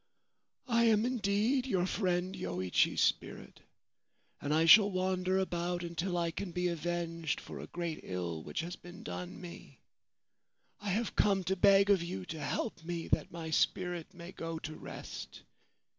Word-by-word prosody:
* - - -43
I - - +5
am 220 -1 +4
indeed 240 +2 +1
your 185 -7 +1
friend 185 -1 0
Yoichi's 90 0 +1
spirit, - - -1 0.8
and 145 - -2
I 160 +2 +4
shall 205 +5 +9
wander 185 0 0
about 175 -1 -1
until 175 +2 -2
I 170 -1 0
can 180 +2 -5
be 180 +1 0
avenged 170 -1 -2
for - - -9
a - - -7
great 170 -2 -4
ill 85 -3 -4
which 80 - -3
has 175 +2 -5
been 175 +5 -12
done 180 -5 -6
me. 175 -2 -11 1.0
I 205 - -4
have 220 +4 -1
come 195 -2 +3
to 190 +2 0
beg 200 +1 +6
of 195 -3 +4
you 95 - -4
to 160 - -7
help 165 +5 -3
me, 170 0 -4
that - - +1
my 165 -1 -6
spirit 175 +2 0
may 175 -1 -10
go 165 -2 -5
to 155 0 -6
rest. - - -8
175 Hz, 165 wpm, -33 LUFS, 165-195 Hz, 1.0 s, shall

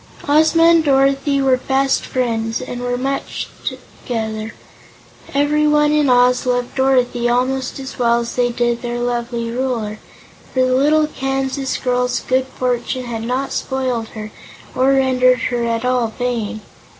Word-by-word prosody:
Ozma 315 +3 +4
and 335 -1 +5
Dorothy 275 0 +2
were 260 -1 +3
fast 270 +1 0
friends 230 -3 -1
and 245 -1 -6
were 245 0 -1
much 270 +2 -3
together. 220 -2 -5 0.8
Everyone 295 +1 +2
in 300 -2 +2
Oz 250 0 +3
loved 245 0 0
Dorothy 250 -2 +1
almost 255 +2 0
as 270 -1 -8
well 235 -1 +3
as 235 - -5
they 245 -1 +1
did 240 0 -1
their 240 -1 -3
lovely 240 -1 -2
Ruler, 235 -4 -2 0.5
for 260 - +1
the 255 - +1
little 300 +4 +3
Kansas 270 -1 -2
girl's 250 -1 0
good 260 0 0
fortune 250 0 -2
had 230 -2 -4
not 255 +4 -2
spoiled 255 -4 -2
her 215 0 -6 0.4
or 265 +2 +3
rendered 255 -1 +3 0.2
her 240 -1 0
at 230 0 -1
all 250 -2 +1
vain. 225 -2 -3
255 Hz, 145 wpm, -18 LUFS, 240-270 Hz, 0.8 s, and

